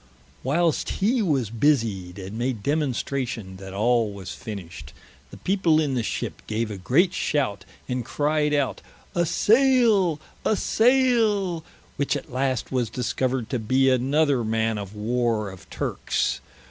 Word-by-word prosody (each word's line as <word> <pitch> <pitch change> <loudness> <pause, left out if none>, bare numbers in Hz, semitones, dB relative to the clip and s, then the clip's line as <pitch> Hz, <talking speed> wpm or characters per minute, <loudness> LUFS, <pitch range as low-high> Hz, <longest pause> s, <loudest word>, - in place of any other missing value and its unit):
Whilest 160 +4 +1
he 230 +5 +2
was 135 - 0
busied, 110 -8 +1
and 95 +2 -7
made 120 -2 -2
demonstration 130 -8 -2
that 95 0 -9
all 115 +2 +2
was 95 -3 -8
finished, 90 - -8 0.4
the - - -11
people 180 -5 +2
in 145 -4 0
the 125 - 0
ship 110 - -4
gave 110 0 -2
a 100 - -5
great 160 - +3
shout, 115 -10 -1 0.2
and 125 -1 -2
cryed 150 +4 0
out, 145 -3 0 0.3
"a 175 -1 +1
sayle, 225 - +4 0.2
a 220 - +2
sayle," 220 -8 +2 0.3
which 140 0 0
at 135 - -10
last 130 -1 -1
was 125 -4 0
discovered 125 +1 -1
to 125 - 0
bee 130 +4 +3
another 135 +1 +2
man 110 0 0
of 100 0 -7
Warre 110 -1 0
of 95 - -14
Turkes. - - -1
130 Hz, 145 wpm, -24 LUFS, 110-155 Hz, 0.4 s, sayle